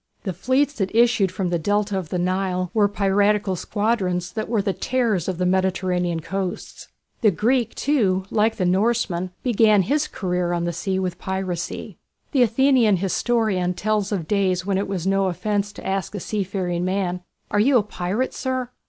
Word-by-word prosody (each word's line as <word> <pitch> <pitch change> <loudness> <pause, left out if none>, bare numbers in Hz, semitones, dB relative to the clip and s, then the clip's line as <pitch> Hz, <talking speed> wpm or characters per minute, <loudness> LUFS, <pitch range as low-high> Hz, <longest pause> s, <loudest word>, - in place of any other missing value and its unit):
The 190 - -3
fleets 275 - +1
that 195 +1 -1
issued 230 -5 +4
from 185 -3 -2
the 170 - +1
Delta 205 +3 0
of 185 -5 -3
the 180 - -2
Nile 185 0 -1
were 210 -2 +4
piratical 200 -1 +1
squadrons, 185 -3 -1
that 215 +2 -4
were 225 -2 +1
the 195 -1 0
terrors 230 -9 0
of 185 -3 -2
the 180 - 0
Mediterranean 180 -2 0
coasts. 185 +2 -5 0.3
The 220 - +5
Greek, 230 +5 +1
too, 200 -10 +1
like 220 +1 +2
the 185 - -1
Norseman, 185 -1 +1
began 215 -4 +4
his 295 - 0
career 180 -2 -2
on 170 -1 -1
the 170 0 -1
sea 190 +3 -2
with 185 -1 -2
piracy. 185 -2 -4 0.3
The 270 - +2
Athenian 240 -3 +4
historian 195 -1 0
tells 210 +1 -1
of 180 -6 -2
days 185 -3 +1
when 195 -1 0
it 200 - -2
was 190 -3 -3
no 195 0 +2
offence 205 +3 -1
to - - -11
ask 195 +1 -2
a - - -3
seafaring 185 -3 -2
man, 185 -1 -1 0.3
"Are 205 - +2
you 255 +5 +5
a 220 - +2
pirate, 205 +5 -2
sir?" 255 -2 -3
195 Hz, 180 wpm, -22 LUFS, 180-215 Hz, 0.3 s, The